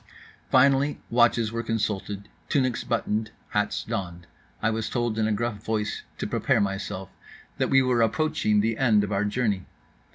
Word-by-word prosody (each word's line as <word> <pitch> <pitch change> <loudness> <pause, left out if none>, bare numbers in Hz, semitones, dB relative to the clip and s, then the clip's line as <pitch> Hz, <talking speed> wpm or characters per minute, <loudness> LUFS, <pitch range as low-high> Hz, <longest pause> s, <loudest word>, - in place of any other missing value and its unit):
Finally 135 +2 +4
watches 120 -2 +3
were 115 0 -2
consulted, 105 -3 -2 0.2
tunics 130 -4 +1
buttoned, 110 -1 -1 0.2
hats 105 0 0
donned. 90 -6 -4 0.3
I 115 - +1
was 110 0 -2
told 120 -3 -1
in 110 - +2
a - - 0
gruff 110 -1 -2
voice 105 -2 -2 0.2
to - - -3
prepare - - +1
myself; 95 -1 -2 0.5
that - - +1
we 135 0 +5
were 125 -2 +2
approaching 110 -3 +2
the 110 +1 -1
end 110 -6 +4
of 105 - -3
our 100 +1 +1
journey. 105 -4 -1
110 Hz, 160 wpm, -26 LUFS, 105-120 Hz, 0.5 s, we